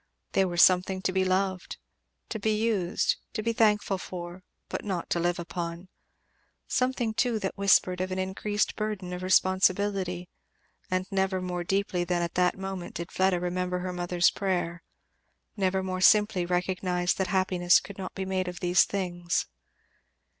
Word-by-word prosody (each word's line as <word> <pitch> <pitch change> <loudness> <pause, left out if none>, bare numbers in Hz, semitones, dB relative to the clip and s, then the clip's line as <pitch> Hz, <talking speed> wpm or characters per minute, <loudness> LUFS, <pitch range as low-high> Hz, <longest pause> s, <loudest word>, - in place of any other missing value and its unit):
They 195 - +3
were 175 -1 -4
something 185 +1 +4
to 185 - +1
be 190 0 +2
loved, 185 0 -1 0.5
to 220 - -4
be 215 +1 +1
used, 205 -6 +1 0.2
to 215 - -3
be 230 +1 0
thankful 210 -3 +2
for, 175 0 -7 0.3
but - - -4
not 190 -5 -4
to 175 - +2
live 175 +1 0
upon; 170 +1 -5 0.8
something 250 -3 0
too 240 0 +1
that 195 -3 -3
whispered 185 -2 +3
of 185 0 -2
an 185 - -2
increased 195 +3 -1
burden 210 -4 -3
of 180 - -5
responsibility, 185 0 +2 0.6
and 185 0 0
never 190 -1 +1
more 180 -1 -3
deeply 195 -1 0
than 175 0 0
at 170 - -3
that 180 +1 +2
moment 190 -2 -6
did 170 0 -5
Fleda 190 -1 +2
remember 180 +1 -2
her 180 0 -4
mother's 175 0 +2
prayer; 175 -3 -2 0.7
never 190 -2 0
more 185 0 -3
simply 205 -2 +4
recognized 180 0 0
that 190 - +1
happiness 180 -1 +3
could 195 +2 -11
not 185 - -6
be 190 - -3
made 190 -1 -1
of 180 -1 -5
these 180 +1 +4
things. 175 -3 -2
185 Hz, 160 wpm, -28 LUFS, 180-195 Hz, 0.8 s, something